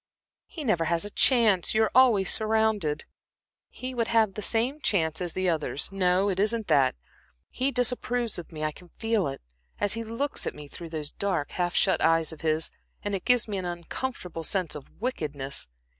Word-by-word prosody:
"He 315 Hz, -, -7 dB
never 180 Hz, -10 st, +1 dB
has 170 Hz, +3 st, 0 dB
a 205 Hz, -, -6 dB
chance. 215 Hz, -8 st, +4 dB
You 220 Hz, -, +5 dB
are 220 Hz, -, 0 dB
always 230 Hz, -7 st, +5 dB
surrounded." 220 Hz, -8 st, +1 dB, 0.6 s
"He 255 Hz, 0 st, -6 dB
would 230 Hz, -2 st, 0 dB
have 220 Hz, -4 st, +3 dB
the 210 Hz, -, -5 dB
same 240 Hz, +8 st, +2 dB
chance 160 Hz, -, +1 dB
as 175 Hz, -2 st, -2 dB
the 185 Hz, 0 st, 0 dB
others. 155 Hz, -4 st, 0 dB
No, 190 Hz, 0 st, +2 dB
it 190 Hz, -2 st, -1 dB
isn't 220 Hz, +2 st, +1 dB
that. 135 Hz, -2 st, +4 dB, 0.6 s
He 260 Hz, +2 st, 0 dB
disapproves 245 Hz, -3 st, 0 dB
of 170 Hz, -, -10 dB
me; 155 Hz, -1 st, -6 dB
I 155 Hz, -, 0 dB
can 175 Hz, +3 st, -15 dB
feel 225 Hz, -5 st, +1 dB
it, 135 Hz, -, -6 dB, 0.4 s
as 205 Hz, -, +2 dB
he 230 Hz, 0 st, -1 dB
looks 230 Hz, +6 st, -2 dB
at -, -, -3 dB
me 150 Hz, -1 st, -10 dB
through 170 Hz, +3 st, -9 dB
those 155 Hz, -2 st, -5 dB
dark, 185 Hz, -7 st, -2 dB
half 175 Hz, -1 st, -1 dB
shut -, -, +3 dB
eyes 165 Hz, -1 st, +3 dB
of 160 Hz, -, -12 dB
his, 155 Hz, 0 st, 0 dB, 0.3 s
and 205 Hz, -, -2 dB
it 195 Hz, -, -3 dB
gives 245 Hz, -2 st, +3 dB
me 200 Hz, -2 st, -2 dB
an 185 Hz, -, -5 dB
uncomfortable 175 Hz, 0 st, -5 dB
sense 180 Hz, 0 st, 0 dB
of 145 Hz, -, -8 dB
wickedness. 145 Hz, -, -3 dB
195 Hz, 195 wpm, -27 LUFS, 165-225 Hz, 0.6 s, You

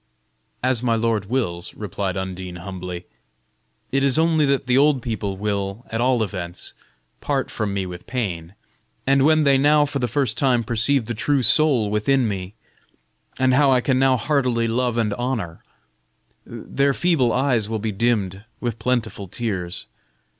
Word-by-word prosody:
"As 130 Hz, -2 st, +2 dB
my 120 Hz, -2 st, +1 dB
lord 115 Hz, -2 st, 0 dB
wills," 100 Hz, -7 st, -2 dB
replied 100 Hz, -2 st, -3 dB
Undine, 95 Hz, -1 st, -5 dB
humbly. 90 Hz, -1 st, -7 dB, 0.9 s
"It 135 Hz, 0 st, +1 dB
is 140 Hz, +1 st, +3 dB
only 160 Hz, -2 st, +3 dB
that 140 Hz, -1 st, +1 dB
the 125 Hz, -1 st, +2 dB
old 140 Hz, -2 st, +3 dB
people 105 Hz, -4 st, -3 dB
will, 100 Hz, +2 st, -3 dB
at 115 Hz, +1 st, -1 dB
all 125 Hz, -2 st, +2 dB
events, 90 Hz, -4 st, -6 dB, 0.5 s
part -, -, -2 dB
from 105 Hz, -2 st, -2 dB
me 100 Hz, -1 st, -2 dB
with 90 Hz, -1 st, -9 dB
pain, 95 Hz, -8 st, -4 dB, 0.5 s
and 135 Hz, 0 st, +3 dB
when 155 Hz, +1 st, +4 dB
they 140 Hz, -2 st, +4 dB
now 145 Hz, +1 st, +4 dB
for 140 Hz, -1 st, -3 dB
the 125 Hz, -, 0 dB
first 120 Hz, -2 st, 0 dB
time 125 Hz, -4 st, +2 dB
perceive 120 Hz, +3 st, +1 dB
the 120 Hz, -, -3 dB
true 135 Hz, +4 st, +1 dB
soul 125 Hz, -4 st, +3 dB
within 120 Hz, +4 st, +2 dB
me, 95 Hz, 0 st, -5 dB, 0.8 s
and 130 Hz, -1 st, +3 dB
how 140 Hz, +1 st, +4 dB
I 130 Hz, -, +4 dB
can 130 Hz, +1 st, +1 dB
now 135 Hz, -1 st, +4 dB
heartily 125 Hz, -4 st, +1 dB
love 120 Hz, +1 st, 0 dB
and 110 Hz, -3 st, +1 dB
honor, 115 Hz, -10 st, -3 dB, 0.9 s
their 140 Hz, 0 st, -1 dB
feeble 160 Hz, -9 st, +2 dB
eyes 125 Hz, -5 st, +1 dB
will 110 Hz, -, -1 dB
be 110 Hz, +1 st, -2 dB
dimmed 100 Hz, -3 st, 0 dB, 0.2 s
with 120 Hz, -2 st, -3 dB
plentiful 115 Hz, -5 st, -2 dB
tears. 95 Hz, -4 st, -4 dB
115 Hz, 160 wpm, -22 LUFS, 100-135 Hz, 0.9 s, when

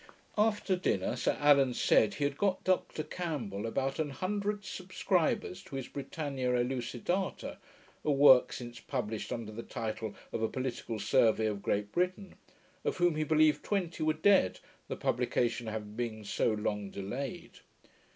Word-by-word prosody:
After 210 Hz, -2 st, +2 dB
dinner, 180 Hz, -, 0 dB
Sir -, -, 0 dB
Allan 140 Hz, -4 st, +5 dB
said 105 Hz, -2 st, +4 dB
he 145 Hz, -, -2 dB
had 140 Hz, 0 st, 0 dB
got 190 Hz, +3 st, 0 dB
Dr 185 Hz, -4 st, 0 dB
Campbell 140 Hz, -, -4 dB
about 135 Hz, +5 st, -1 dB
a 150 Hz, -2 st, -1 dB
hundred 205 Hz, +5 st, -2 dB
subscribers 185 Hz, -1 st, -1 dB
to -, -, -8 dB
his 135 Hz, -2 st, -4 dB
Britannia 135 Hz, -3 st, -2 dB
Elucidata 125 Hz, +9 st, -2 dB, 0.5 s
(a 150 Hz, -, +2 dB
work 135 Hz, -2 st, +7 dB
since 120 Hz, -1 st, -7 dB
published 110 Hz, -5 st, -3 dB
under 115 Hz, -3 st, -4 dB
the 110 Hz, +2 st, -6 dB
title 110 Hz, -2 st, -4 dB, 0.2 s
of -, -, -2 dB
A 110 Hz, -, +1 dB
Political 130 Hz, -3 st, -3 dB
Survey 110 Hz, +2 st, +3 dB
of 105 Hz, -2 st, -1 dB
Great 105 Hz, +1 st, -1 dB
Britain), 185 Hz, +2 st, -1 dB, 0.5 s
of -, -, -1 dB
whom 175 Hz, -3 st, +3 dB
he 155 Hz, -, +1 dB
believed 155 Hz, 0 st, +3 dB
twenty 180 Hz, -6 st, -2 dB
were 155 Hz, 0 st, +3 dB
dead, 160 Hz, -, +4 dB, 0.3 s
the -, -, -3 dB
publication 120 Hz, -1 st, 0 dB
having 105 Hz, -1 st, -5 dB
been 110 Hz, -2 st, -3 dB
so 105 Hz, +3 st, +1 dB
long 105 Hz, -1 st, -2 dB
delayed. 120 Hz, +8 st, -6 dB
135 Hz, 150 wpm, -32 LUFS, 110-170 Hz, 0.5 s, work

